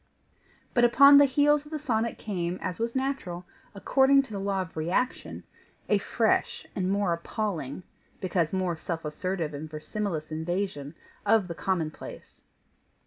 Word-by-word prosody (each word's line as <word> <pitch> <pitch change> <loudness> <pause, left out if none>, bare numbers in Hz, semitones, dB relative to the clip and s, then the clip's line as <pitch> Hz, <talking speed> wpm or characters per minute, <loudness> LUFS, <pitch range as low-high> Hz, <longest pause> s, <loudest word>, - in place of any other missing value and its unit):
But 240 - +3
upon 280 +4 +8
the 285 - +7
heels 290 +2 +3
of 300 - -15
the 310 - -2
sonnet 235 -6 -1
came, 180 -4 -3
as 180 - -4
was 230 +2 -2
natural, 260 -10 -2 0.3
according 270 +6 +4
to 265 - -14
the 200 - -4
law 195 -1 -1
of 170 - -14
reaction, 175 +11 -2 0.4
a - - +3
fresh - - 0
and 185 -1 -1
more 200 -3 +1
appalling, 170 -4 -4 0.4
because 175 -4 0
more 185 -2 0
self 165 0 -5
assertive 165 +1 -3
and 150 +2 -6
verisimilous 155 0 -4
invasion 160 -2 -3 0.3
of 220 -5 +3
the 170 - -4
commonplace. 165 -3 -4
190 Hz, 145 wpm, -27 LUFS, 170-235 Hz, 0.4 s, upon